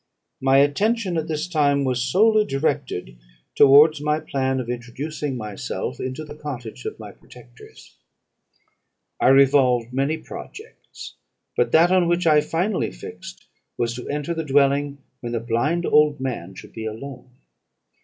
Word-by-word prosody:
My 135 0 +4
attention, 190 +8 +1
at 160 -1 -2
this 155 +1 -3
time, 145 -5 +2
was 125 -2 -1
solely 215 - +3
directed 135 - -3 0.3
towards 145 +2 +6
my 150 +1 0
plan 130 -3 -2
of 125 - -5
introducing 130 +4 -5
myself 105 - -5
into 130 +4 -5
the 145 - -10
cottage 135 -7 -8
of - - -5
my - - -10
protectors. - - -17 1.2
I - - +3
revolved 130 -3 +4
many 140 +4 0
projects; 430 - -11 0.4
but - - +1
that 170 +3 +5
on 185 -2 +3
which 175 +1 +1
I 150 -2 +5
finally 180 +6 -1
fixed - - -11 0.3
was, 115 -1 -1
to 125 +1 -8
enter 150 +3 -2
the 165 -1 -3
dwelling 140 0 +2 0.2
when 120 -1 -6
the 115 - 0
blind 120 +10 -1
old 150 -1 +3
man 120 -9 -5
should - - -12
be 110 0 -5
alone. 125 +3 -9
140 Hz, 145 wpm, -22 LUFS, 125-155 Hz, 1.2 s, towards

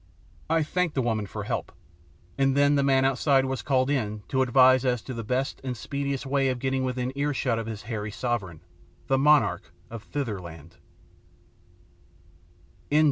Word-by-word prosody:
I 165 0 +2
thanked 180 +1 -1
the 135 - +2
woman 110 -3 -1
for - - -6
help, - - -3 0.6
and 135 0 +2
then 145 0 +4
the 140 - +3
man 135 -1 +3
outside 135 0 +3
was 130 0 -3
called 130 -3 +1
in 110 -6 -2
to 130 - +1
advise 130 0 +5
as 125 -3 0
to 130 - -6
the 115 -1 -5
best 130 +5 -2
and 125 -2 -4
speediest 140 +5 -3
way 135 0 +1
of 130 - -1
getting 130 +1 -1
within 125 0 -2
earshot 140 -5 0
of 115 - -5
his 110 -2 -6
hairy 105 -1 -4
sovereignty, 105 -7 -4 0.4
the 135 0 +1
monarch 150 +1 +3 0.2
of 115 -2 -7
Thitherland. 85 - -6
130 Hz, 160 wpm, -26 LUFS, 115-135 Hz, 0.6 s, advise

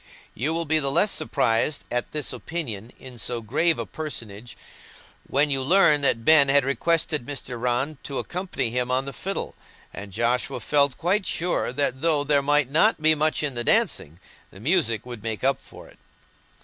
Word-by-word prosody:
You 140 +8 -1
will 165 0 -2
be 155 +1 +2
the 140 -2 0
less 200 +9 +2
surprised 115 -1 0
at 120 0 -2
this 150 -2 -2
opinion 120 -10 -5
in 125 -2 -12
so 120 +3 -1
grave 150 +9 +1
a - - -3
personage 120 -7 -7 0.7
when 145 +2 +1
you 135 -1 +1
learn 150 0 +4
that 115 -5 +1
Ben 150 -3 +6
had 140 -1 +4
requested 155 0 0
Mr. 125 -3 -6
Rann 125 +4 -1
to 140 - -5
accompany 180 -9 -3
him 125 +1 -1
on 130 +1 0
the 140 - -6
fiddle, 195 +1 -4 0.4
and 100 0 -8
Joshua 120 +5 0
felt 140 +2 +2
quite 185 +4 0
sure 175 -6 -1
that 130 -1 -1
though 155 -3 +2
there 145 -1 +3
might 145 -1 +1
not 185 +8 +3
be 155 0 +5
much 155 0 0
in 145 -3 -1
the 120 -1 -2
dancing, 80 -6 +1 0.3
the 95 - -15
music 135 - +1
would 120 -3 -8
make 110 0 -5
up 135 +1 +2
for - - -14
it. - - -20
140 Hz, 185 wpm, -24 LUFS, 120-155 Hz, 0.7 s, Ben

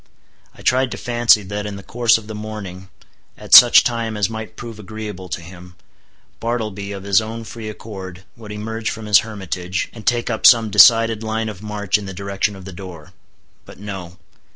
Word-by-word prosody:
I - - -15
tried 130 0 +2
to - - -6
fancy 120 -3 +3
that 105 +2 -5
in 105 - -6
the 100 - -10
course 115 +1 +2
of 110 - -11
the 110 - -8
morning, 105 -4 -8 0.5
at - - -6
such - - +10
time 115 -2 -2
as 105 +1 0
might 110 0 -7
prove 115 -3 -9
agreeable 105 -3 -8
to 85 - -4
him, 90 +1 -13 0.6
Bartleby, 110 -4 -4
of 100 -1 -7
his 100 +1 +3
own 115 +1 -6
free 110 0 -8
accord, 95 -4 -9
would 110 -2 -11
emerge 110 +1 -4
from 110 -1 -6
his 105 -3 +6
hermitage, 95 -4 -4
and 110 - -11
take 120 0 0
up 110 - +4
some 115 -3 +5
decided 115 +2 +6
line 110 0 -2
of 100 -3 -9
march 105 -1 -1
in 100 - -8
the 95 - -7
direction 100 +1 -2
of 95 -1 -12
the 95 - -9
door. 85 -4 -11 0.5
But - - -14
no. 95 -3 -8
105 Hz, 195 wpm, -19 LUFS, 95-110 Hz, 0.6 s, such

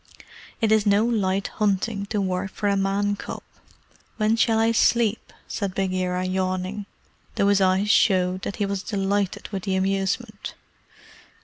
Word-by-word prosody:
"It 220 -1 +2
is 215 -1 +3
no 205 +2 +4
light 195 -4 0
hunting 200 0 -1
to 210 0 -1
work 185 0 -1
for 205 - -3
a 200 - +2
Man 200 +1 0
cub. - - -7 0.7
When 215 0 +2
shall 225 0 +2
I 225 +1 +3
sleep?" 230 -1 +2 0.2
said 195 -2 -3
Bagheera, 185 -1 -1
yawning, 185 +2 -2 0.5
though 200 - +2
his 200 -1 +3
eyes 190 +2 +3
showed 185 -3 +3
that 200 - -4
he 205 - -1
was 200 -1 -2
delighted 200 -1 -2
with 195 -2 -4
the 190 0 -1
amusement. 195 +3 -2
200 Hz, 150 wpm, -24 LUFS, 190-210 Hz, 0.7 s, no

